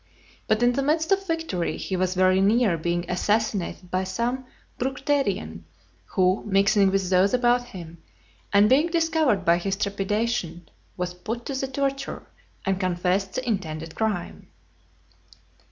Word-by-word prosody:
But, 215 +2 +2
in 245 0 +4
the 275 - 0
midst 315 +5 0
of 390 0 +2
victory, 325 - -2
he 190 - -3
was 185 0 0
very 185 +1 +4
near 210 -1 +3
being 170 +2 -2
assassinated 195 -1 -1
by 185 +1 0
some 240 +7 -2 0.3
Bructerian, 270 +2 -1 0.4
who 185 0 +1
mixing 200 0 +4
with 190 -1 0
those 190 +4 +4
about 245 0 +2
him, 170 -8 -10 0.5
and 205 +1 +5
being 280 +8 +4
discovered 320 - +1
by 170 +1 +4
his 195 +2 -1
trepidation, 200 -3 -2 0.3
was 180 -1 -3
put 225 +7 -6
to 275 - -4
the 270 0 -2
torture, 275 0 -3 0.4
and 195 -1 0
confessed 185 +1 0
his 255 - -2
intended 165 -8 -3
crime. 215 -6 -3
200 Hz, 140 wpm, -25 LUFS, 185-250 Hz, 0.5 s, and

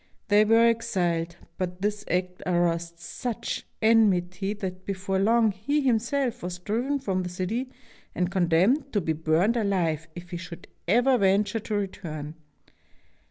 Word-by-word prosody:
They 210 +1 +6
were 225 +2 +5
exiled; 175 -7 0 0.2
but 180 0 -3
this 210 0 -1
act 180 0 -1
aroused 170 -1 0
such 225 +6 -4 0.2
enmity 195 -4 +3
that 185 -3 -5
before 190 0 -2
long 225 +2 +4
he 245 +10 -1
himself 245 0 0
was 180 0 -4
driven 235 +10 -1
from 195 -9 -1
the 180 - -4
city 200 +9 -3 0.5
and 180 0 0
condemned 190 - +2
to 205 - +3
be 160 -3 -1
burned 160 +9 +2
alive 175 -7 0
if 175 +1 -10
he 175 - -3
should 170 -1 -9 0.2
ever 245 +6 +4
venture 205 +3 +2
to 215 0 -4
return. 155 -7 -4
195 Hz, 145 wpm, -26 LUFS, 175-225 Hz, 0.5 s, They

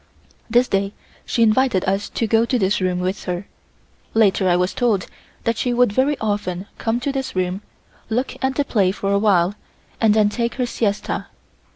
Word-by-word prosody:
This 245 +2 +4
day 195 +1 0 0.3
she 230 - +2
invited 225 -3 +3
us 195 +2 -1
to 230 - -1
go 225 +1 +3
to 250 +2 +1
this 195 -2 +1
room 180 -1 0
with 185 +2 -3
her. 180 +1 -3 0.7
Later 200 -4 +3
I 175 - +4
was 180 +1 +1
told 225 -7 +1 0.4
that 230 -1 0
she 245 -1 0
would 245 -4 +3
very 270 +5 +2
often 205 -4 -2
come 230 +1 0
to 280 - -1
this 270 -5 -4
room, 185 +1 -1 0.5
look 245 +4 -1
at 265 0 +1
the 285 - +1
play 200 -8 +2
for 195 0 -2
a 200 - +3
while 195 -3 +3 0.5
and 220 -2 +4
then 215 -1 +4
take 235 +2 -2
her 255 - 0
siesta. 215 -3 -2
210 Hz, 190 wpm, -21 LUFS, 190-240 Hz, 0.7 s, This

